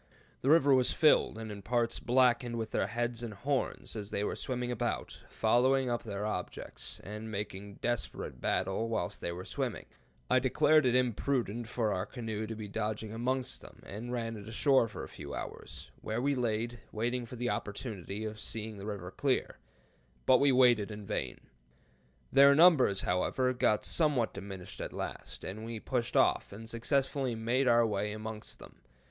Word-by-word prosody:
The 135 - +1
river 145 -3 +6
was 130 -1 +4
filled, 155 -7 +4
and 110 -1 -6
in 100 -1 -7
parts 120 +2 0
blackened 120 -1 +3
with 110 -1 -3
their - - +1
heads 120 0 -2
and 115 -3 -5
horns, 135 +3 -2
as 105 -2 -5
they 100 - -1
were - - -1
swimming 125 -1 -2
about, 120 - -2
following 125 +3 +3
up 120 - 0
their 100 -2 -4
objects, 100 -4 -5
and 105 +2 -6
making 100 -1 -5
desperate 120 - -2
battle 95 +5 0
whilst 110 -6 -2
they 85 - -2
were 90 +2 -6
swimming. - - -3 0.4
I - - +4
deemed 155 -2 +4
it 125 - +3
imprudent 120 -2 0
for 110 -3 0
our 95 +2 -2
canoe 110 -3 -4
to 115 - -5
be 110 -1 -6
dodging 105 +1 -3
amongst 125 +3 -2
them, - - -14
and 115 +5 -6
ran 115 -2 -2
it 105 0 -10
ashore 130 +2 +3
for 110 - -7
a - - -6
few - - -8
hours, - - -7
where 110 +2 -2
we 140 +3 +2
laid, 120 -1 -1
waiting 120 +2 -1
for 125 - -8
the 120 0 -1
opportunity 105 -1 -4
of 110 0 -5
seeing 110 -1 -4
the 100 +1 -7
river 95 -4 -5
clear, 135 +5 0 0.7
but 130 - +6
we 140 0 +5
waited 120 -5 +5
in 105 -1 -7
vain. 65 -9 -2 0.9
Their 140 +1 +8
numbers, 145 - +6
however, 125 +8 +1
got 110 -4 +2
somewhat 145 -8 +2
diminished 95 -2 -7
at - - -5
last, - - -6
and 105 +4 -6
we 115 0 -5
pushed 120 0 -1
off, - - +3
and 110 +3 -9
successfully 130 +2 0
made 120 +4 +1
our 120 -1 +5
way 105 -1 -1
amongst 110 0 -6
them. - - -13
115 Hz, 175 wpm, -32 LUFS, 105-125 Hz, 0.9 s, Their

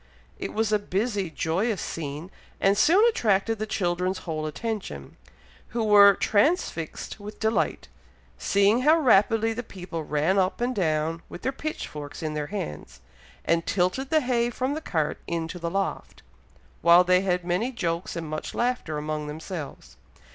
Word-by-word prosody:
It - - -4
was 220 0 0
a 210 - +4
busy 205 -1 -1
joyous 180 +7 -1
scene, 155 +3 -5 0.3
and 195 +1 +3
soon 370 - +5
attracted 225 - +1
the 215 - -2
children's 185 -2 -1
whole 155 -2 -3
attention, 170 - -5 0.5
who 230 0 -2
were 205 -2 +7
transfixed 215 - 0
with 205 +1 -9
delight, 220 +1 0 0.5
seeing 200 +4 +3
how 305 +5 +5
rapidly 225 -4 +4
the 235 - -4
people 180 -7 -7
ran 155 +6 +1
up 185 +1 0
and 245 +1 0
down, 160 -2 0
with 175 - -9
their 265 - 0
pitchforks 155 - -6
in 155 -1 -2
their 150 -1 -3
hands, 150 - -6 0.5
and 165 0 +1
tilted 195 +9 0
the 315 -1 +3
hay 240 -2 +1
from 255 +3 -2
the 310 - -4
cart 155 - -1
into 170 +1 -3
the 170 0 -2
loft, 195 +2 -3 0.6
while 170 +2 +7
they 180 0 +4
had 180 -2 0
many 185 +9 0
jokes 175 -5 -3
and 165 -2 -4
much 155 0 -5
laughter 240 -11 -1
among 150 0 -3
themselves. 150 - -7
190 Hz, 155 wpm, -26 LUFS, 165-225 Hz, 0.6 s, were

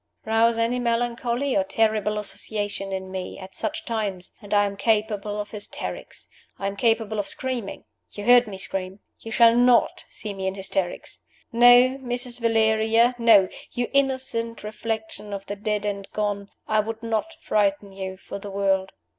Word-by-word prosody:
Rouse 225 +1 +3
any 230 +2 +1
melancholy 240 +2 0
or 195 - +3
terrible 210 +1 +1
associations 205 -1 -2
in 190 0 -4
me 185 -1 -5
at 190 -1 -10
such 320 +1 -3
times, 205 -7 -3
and 205 - -12
I 205 0 +4
am 200 0 -3
capable 210 -1 0
of 205 - -5
hysterics, 210 -1 -6 0.3
I 195 - -5
am 195 0 -2
capable 225 -1 +1
of 205 - -2
screaming. 255 -6 -3 0.3
You 205 - -8
heard 245 +1 +6
me 195 -2 -7
scream. 190 0 -4 0.2
You 225 - -9
shall 230 0 +6
not 245 0 +3
see 210 -2 -5
me 190 -1 -3
in 190 - -2
hysterics. 190 -2 -3 0.3
No, 245 +2 +6
Mrs. 245 -1 -3
Valeria 225 +1 +3
no, 220 -5 +6 0.3
you 245 -1 -2
innocent 260 -5 0
reflection 220 -1 -5
of 200 0 -5
the 205 - -5
dead 210 0 -2
and 200 -1 -3
gone 205 -1 -2 0.2
I 215 - +2
would 225 +1 -3
not 230 +9 -2
frighten 200 -1 0
you 190 -1 -6
for 200 - -8
the 205 - -8
world. 195 -1 0
215 Hz, 165 wpm, -24 LUFS, 200-235 Hz, 0.3 s, heard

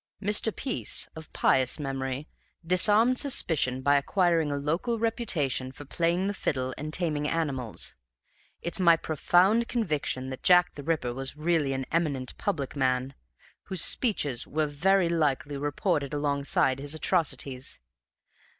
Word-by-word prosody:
Mr. 210 +2 +2
Peace, 260 -3 -1
of 160 -1 -10
pious 130 -1 +2
memory, 135 0 -4 0.4
disarmed 210 +8 +3
suspicion 145 - +1
by 145 +1 +4
acquiring 165 0 +1
a - - -1
local 165 +12 -1
reputation 160 - 0
for 145 +2 -11
playing 170 +5 0
the 200 - -1
fiddle 130 -8 -2
and 155 +2 -6
taming 155 -4 0
animals, 140 -9 -2
and - - -19
it's 170 - +1
my 170 -3 +5
profound 180 +9 +2
conviction 150 - -2
that 130 - -7
Jack 180 -1 +5
the 145 - -8
Ripper 145 -5 -1
was 135 +2 -4
a - - -18
really 160 -4 +1 0.2
eminent 145 -6 -1
public 150 -10 -2
man, 130 -1 0 0.5
whose 190 - +2
speeches 145 - +1
were 155 +1 0
very 175 +6 +2
likely 150 -3 0
reported 145 +1 -1
alongside 140 -2 +1
his 145 +2 -3
atrocities. 140 -6 -2
150 Hz, 140 wpm, -27 LUFS, 135-180 Hz, 0.5 s, my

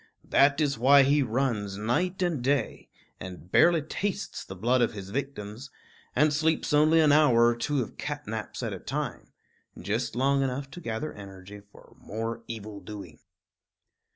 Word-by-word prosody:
That 140 +1 +4
is 140 -6 0
why 140 +3 +7
he 145 +2 +3
runs 115 -6 -1
night 180 - 0
and 170 -7 0
day, 140 +2 -1 0.3
and 90 -1 -9
barely 170 -3 +5
tastes 200 +6 -4
the 95 - -9
blood 120 +6 +2
of 120 - +1
his 100 -2 -8
victims, 125 -1 -5 0.5
and 150 0 +3
sleeps 160 +1 0
only 155 +2 +5
an 155 -2 +5
hour 135 -6 +5
or 120 0 +3
two 130 +3 -1
of - - -12
cat 145 0 -4
naps 105 0 -5
at - - -2
a - - -6
time - - -4 0.5
just 110 +6 -2
long 135 +2 +2
enough 135 +1 -3
to 175 - -9
gather 115 +4 -4
energy 100 0 -11
for - - -18
more 115 +2 -5
evil 110 -2 -7
doing. 100 -9 -10
125 Hz, 165 wpm, -27 LUFS, 105-145 Hz, 0.5 s, why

